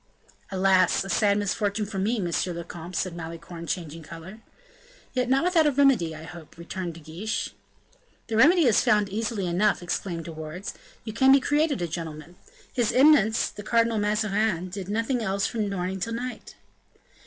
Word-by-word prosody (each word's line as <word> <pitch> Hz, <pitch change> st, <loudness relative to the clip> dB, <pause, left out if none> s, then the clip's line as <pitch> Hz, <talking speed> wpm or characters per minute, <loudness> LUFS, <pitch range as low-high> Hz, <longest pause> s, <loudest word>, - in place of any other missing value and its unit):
"Alas! 190 Hz, -2 st, +3 dB
a -, -, -7 dB
sad 205 Hz, -2 st, +3 dB
misfortune 205 Hz, +1 st, -1 dB
for 200 Hz, -1 st, -5 dB
me, 220 Hz, +4 st, 0 dB
monsieur 175 Hz, -1 st, -1 dB
le 170 Hz, 0 st, -5 dB
comte," 175 Hz, +1 st, -9 dB
said 180 Hz, 0 st, -2 dB
Malicorne, 170 Hz, 0 st, -8 dB
changing 165 Hz, -2 st, -4 dB
color. 170 Hz, +6 st, -10 dB, 0.7 s
"Yet 250 Hz, -1 st, 0 dB
not 270 Hz, +3 st, +3 dB
without 320 Hz, -6 st, +3 dB
remedy, 245 Hz, -, +3 dB
I 155 Hz, -, -9 dB
hope," 165 Hz, -1 st, -11 dB
returned 170 Hz, 0 st, -5 dB
De -, -, -10 dB
Guiche. 165 Hz, +8 st, -4 dB, 0.7 s
"The 225 Hz, -, -3 dB
remedy 320 Hz, +8 st, +6 dB
is 230 Hz, -4 st, +5 dB
found 210 Hz, -1 st, +3 dB
easily 210 Hz, -1 st, -2 dB
enough," 180 Hz, +2 st, +1 dB
exclaimed 175 Hz, -1 st, -3 dB
De 170 Hz, -, -6 dB
Wardes; 160 Hz, +4 st, -7 dB, 0.3 s
"you 220 Hz, -, -6 dB
can 265 Hz, +4 st, +5 dB
be 275 Hz, -, +7 dB
created 290 Hz, -, +1 dB
a -, -, -1 dB
gentleman. 165 Hz, 0 st, -7 dB, 0.4 s
His 240 Hz, -4 st, +1 dB
Eminence, 255 Hz, -6 st, +5 dB
the -, -, -9 dB
Cardinal 230 Hz, +1 st, +2 dB
Mazarin, 210 Hz, -3 st, 0 dB
did 190 Hz, 0 st, -6 dB
nothing 230 Hz, +4 st, 0 dB
else 200 Hz, -2 st, 0 dB
from 215 Hz, -3 st, -1 dB
morning 190 Hz, 0 st, -3 dB
till 230 Hz, +5 st, -3 dB
night." 245 Hz, +2 st, -6 dB
200 Hz, 170 wpm, -26 LUFS, 175-230 Hz, 0.7 s, be